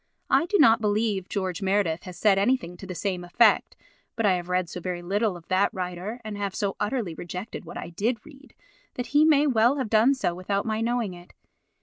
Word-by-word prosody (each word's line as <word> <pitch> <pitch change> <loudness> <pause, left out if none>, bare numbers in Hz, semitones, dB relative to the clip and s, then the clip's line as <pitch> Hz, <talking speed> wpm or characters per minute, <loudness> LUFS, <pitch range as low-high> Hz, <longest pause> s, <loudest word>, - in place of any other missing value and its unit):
I 335 - +4
do 410 - +2
not 230 - +6
believe 210 -2 0
George 190 -3 -3
Meredith 190 -4 0
has 180 -1 -9
said 195 0 +3
anything 205 -5 0
to 190 - -10
the 185 - -6
same 180 0 -2
effect, 210 +5 +3 0.4
but 225 -2 0
I 195 - +5
have 175 0 -3
read 180 -1 0
so 180 - -7
very 175 0 -4
little 200 +1 0
of 170 - -17
that 185 +2 +2
writer, 185 +5 -4
and 215 -1 -5
have 200 -2 -3
so 200 -2 -1
utterly 210 -5 -2
rejected 180 +6 -7
what - - -8
I - - -7
did 220 +8 -1
read, 280 -2 -16 0.4
that 245 - -3
he 295 +1 +6
may 300 -2 +5
well 245 0 +3
have 255 -6 -3
done 230 +5 +5
so 215 -9 -1
without 195 +3 -2
my 220 -1 -1
knowing 230 -4 -1
it. 175 0 -14
200 Hz, 220 wpm, -26 LUFS, 180-230 Hz, 0.4 s, not